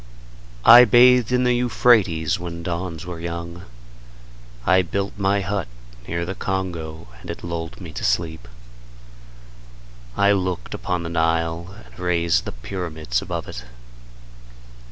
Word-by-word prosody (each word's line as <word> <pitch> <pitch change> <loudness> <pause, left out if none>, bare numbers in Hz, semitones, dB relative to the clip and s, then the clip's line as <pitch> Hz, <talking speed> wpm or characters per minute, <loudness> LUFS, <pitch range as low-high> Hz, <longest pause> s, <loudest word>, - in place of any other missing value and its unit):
I 120 +2 +11
bathed 125 0 +5
in 125 0 +2
the 125 0 +3
Euphrates 110 -10 +2
when 85 -1 -6
dawns 85 -1 -4
were 90 -2 -7
young. 85 +1 -6 1.0
I 95 0 +5
built 100 +2 -3
my 100 0 +1
hut 95 -1 -2 0.4
near 85 +1 -2
the 95 - -4
Congo 85 -7 -4
and - - -11
it - - -6
lulled 85 -1 -5
me 85 -4 -9
to - - -7
sleep. 80 +1 -1 1.7
I 100 0 +4
looked 95 -8 -2
upon 90 -2 -3
the 85 - -5
Nile 85 +2 -1
and - - -18
raised 85 -1 +1
the - - -4
pyramids 80 -3 -4
above - - -5
it. 60 - -8
85 Hz, 135 wpm, -22 LUFS, 80-95 Hz, 1.7 s, I